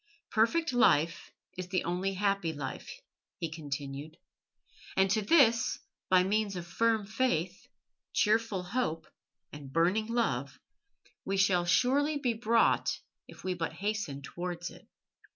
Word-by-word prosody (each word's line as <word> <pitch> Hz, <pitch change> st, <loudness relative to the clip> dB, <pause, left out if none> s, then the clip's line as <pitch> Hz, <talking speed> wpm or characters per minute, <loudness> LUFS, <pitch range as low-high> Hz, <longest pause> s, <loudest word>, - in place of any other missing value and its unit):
Perfect 260 Hz, +8 st, +2 dB
life 165 Hz, -9 st, +3 dB, 0.3 s
is 185 Hz, -, -4 dB
the 185 Hz, 0 st, -1 dB
only 185 Hz, +3 st, -1 dB
happy 195 Hz, -4 st, 0 dB
life," 140 Hz, -3 st, -6 dB, 0.5 s
he 165 Hz, -5 st, -4 dB
continued, 145 Hz, 0 st, -6 dB, 0.8 s
"and 190 Hz, 0 st, +4 dB
to 215 Hz, -, +2 dB
this, 230 Hz, -2 st, +4 dB, 0.3 s
by 185 Hz, -1 st, +5 dB
means 205 Hz, +1 st, 0 dB
of 175 Hz, -1 st, -5 dB
firm 220 Hz, +4 st, +1 dB
faith, 195 Hz, -6 st, -1 dB, 0.4 s
cheerful 215 Hz, -3 st, +1 dB
hope, 180 Hz, -6 st, -2 dB, 0.5 s
and 145 Hz, -2 st, -9 dB
burning 180 Hz, +8 st, +2 dB
love 235 Hz, 0 st, -1 dB, 0.6 s
we 195 Hz, 0 st, -1 dB
shall 185 Hz, -3 st, +3 dB
surely 275 Hz, -, +2 dB
be 250 Hz, -4 st, 0 dB
brought 230 Hz, +1 st, +2 dB, 0.3 s
if -, -, -14 dB
we 185 Hz, -, -1 dB
but 170 Hz, -2 st, -3 dB
hasten 200 Hz, -9 st, -3 dB
towards 175 Hz, +2 st, -5 dB
it." -, -, -16 dB
190 Hz, 130 wpm, -30 LUFS, 170-225 Hz, 0.8 s, by